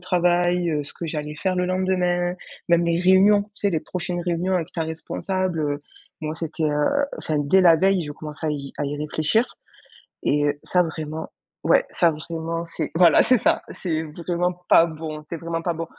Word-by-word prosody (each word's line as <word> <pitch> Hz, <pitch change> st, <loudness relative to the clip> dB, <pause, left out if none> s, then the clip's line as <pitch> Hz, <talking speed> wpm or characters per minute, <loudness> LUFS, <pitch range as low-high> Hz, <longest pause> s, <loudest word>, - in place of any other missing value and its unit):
travail, 175 Hz, -1 st, +2 dB
heu, 150 Hz, -2 st, -1 dB
ce -, -, -10 dB
que 170 Hz, -, -6 dB
j'allais 150 Hz, -1 st, -4 dB
faire 185 Hz, +3 st, -1 dB
le 180 Hz, -, +1 dB
lendemain, 180 Hz, -1 st, 0 dB, 0.3 s
même 170 Hz, 0 st, +4 dB
les 170 Hz, 0 st, +1 dB
réunions, 195 Hz, +3 st, +5 dB
tu 210 Hz, -, -26 dB
sais, 200 Hz, -1 st, 0 dB
les 160 Hz, -3 st, 0 dB
prochaines 175 Hz, 0 st, -4 dB
réunions 175 Hz, +2 st, -1 dB
avec 170 Hz, -2 st, -1 dB
ta 165 Hz, -, -2 dB
responsable, 175 Hz, +2 st, -3 dB
heu, 145 Hz, -1 st, -1 dB, 0.4 s
moi 155 Hz, 0 st, -3 dB
c'était, 160 Hz, -1 st, -4 dB
heu 155 Hz, -, +1 dB
enfin, 155 Hz, -1 st, -1 dB
dès 160 Hz, +7 st, +4 dB
la 170 Hz, -2 st, +7 dB
veille, 190 Hz, -1 st, +2 dB
je 145 Hz, -, -6 dB
commençais 155 Hz, +1 st, -7 dB
à -, -, +1 dB
y 140 Hz, -2 st, -4 dB
à 145 Hz, -, -1 dB
y 145 Hz, +1 st, -3 dB
réfléchir 155 Hz, +9 st, +1 dB, 0.8 s
et 145 Hz, +1 st, +2 dB
heu, 145 Hz, 0 st, -1 dB
ça 180 Hz, -, +2 dB
vraiment 160 Hz, -1 st, -5 dB, 0.4 s
ouais, -, -, +4 dB
ça 170 Hz, -, +3 dB
vraiment 165 Hz, +2 st, -4 dB
c'est 165 Hz, -2 st, -4 dB
voilà, 170 Hz, -3 st, +6 dB
c'est 255 Hz, -, +4 dB
ça! -, -, +2 dB, 0.2 s
C'est 160 Hz, -3 st, 0 dB
vraiment 170 Hz, +3 st, -2 dB, 0.2 s
pas 165 Hz, -, +7 dB
bon. 155 Hz, -1 st, -7 dB
C'est 170 Hz, -, -4 dB
vraiment 165 Hz, 0 st, -3 dB
pas 175 Hz, 0 st, -1 dB
bon. 165 Hz, +1 st, -4 dB
170 Hz, 200 wpm, -23 LUFS, 155-180 Hz, 0.8 s, la